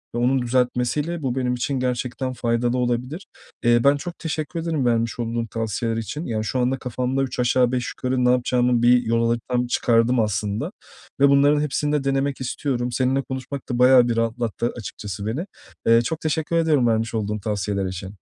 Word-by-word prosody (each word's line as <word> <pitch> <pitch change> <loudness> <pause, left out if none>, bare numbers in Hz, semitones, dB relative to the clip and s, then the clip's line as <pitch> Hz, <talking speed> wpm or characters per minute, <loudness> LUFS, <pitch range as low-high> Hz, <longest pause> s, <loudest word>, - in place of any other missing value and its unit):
ve - - -1
onun 130 +2 +2
düzeltmesiyle 125 +6 0
bu 130 -3 -2
benim 125 -1 0
için 130 +2 -2
gerçekten 125 +1 -2
faydalı 120 0 0
olabilir. 125 +8 -2 0.4
Eee, 120 0 +5
ben 140 +1 +5
çok 175 +4 -7
teşekkür 160 +1 -3
ederim 160 -5 -1
vermiş 115 0 0
olduğun 115 0 -2
tavsiyeler 115 +1 -2
için. 150 +8 -4
Yani, 110 -2 -2
şu 125 +4 -2
anda 125 +2 +1
kafamda 125 +2 -2
üç 130 -2 -5
aşağı 125 0 +3
beş 125 -1 -1
yukarı 130 0 -1
ne - - +4
yapacağımı, 125 -1 +2
bir 125 +1 +5
yol 115 +1 +1
haritamı 120 +1 -1
çıkardım 120 0 +2
aslında 105 0 -1 0.5
ve 140 0 +6
bunların 145 +1 +4
hepsini 150 0 -1
de 150 -2 +1
denemek 135 0 -1
istiyorum. 125 -1 -2
Seninle 130 +2 +1
konuşmak 130 +1 -6
da 120 - -2
bayağı 125 -1 +6
bir 120 - 0
rahatlattı 115 0 -1
açıkçası 100 -3 -6
beni. 125 - -2 0.4
Eee, 115 0 +6
çok 155 +7 -3
teşekkür 160 +1 -1
ederim 155 -7 +3
vermiş 115 0 0
olduğun 105 -1 -2
tavsiyeler 100 -1 -2
için. 95 +2 -6
125 Hz, 180 wpm, -23 LUFS, 115-135 Hz, 0.5 s, ve